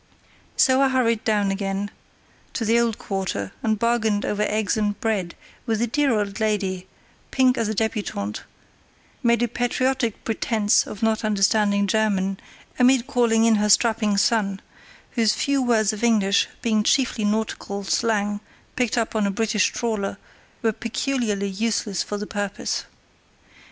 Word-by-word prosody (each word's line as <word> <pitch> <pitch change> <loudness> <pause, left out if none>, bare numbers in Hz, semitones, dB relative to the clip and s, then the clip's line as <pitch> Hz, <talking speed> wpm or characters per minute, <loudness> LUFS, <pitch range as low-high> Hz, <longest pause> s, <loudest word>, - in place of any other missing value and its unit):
So 260 0 +4
I 270 - +4
hurried 230 -4 +1
down 205 -2 +1
again 195 0 -3 0.6
to 230 - -2
the 230 +2 +3
old 230 -2 0
quarter 190 - -3
and 220 -1 0
bargained 220 -2 +1
over 210 0 -1
eggs 210 -2 0
and 210 -2 -1
bread 200 -6 -2 0.3
with 220 -2 0
a 235 - +2
dear 280 +4 +1
old 205 0 -3
lady, 195 -4 -1 0.4
pink 255 -1 +3
as 230 -3 -1
a 215 - -2
débutante, 200 - -2 0.8
made 235 0 +2
a - - +2
patriotic 245 0 -1
pretence 220 -1 +1
of 210 +2 -7
not 220 0 +1
understanding 205 -1 +2
German, 195 -2 0 0.4
and 250 -1 +4
called 240 -3 +1
in 225 0 +4
her 210 0 +1
strapping 215 -1 +3
son, 200 -2 +1 0.5
whose 225 -3 +2
few 280 -1 +1
words 225 -4 +2
of 215 - -7
English, 205 -4 +3 0.2
being 220 -3 +2
chiefly 235 0 +1
nautical 205 -1 -2
slang 205 0 0 0.4
picked 245 -2 0
up 230 -1 -1
on 210 -2 +2
a - - 0
British 210 +1 +1
trawler, 215 -4 -2 0.5
were 225 -1 +2
peculiarly 230 -3 -2
useless 205 -1 -1
for 205 - -4
the 210 - -5
purpose. 205 -1 -3
215 Hz, 150 wpm, -23 LUFS, 205-230 Hz, 0.8 s, So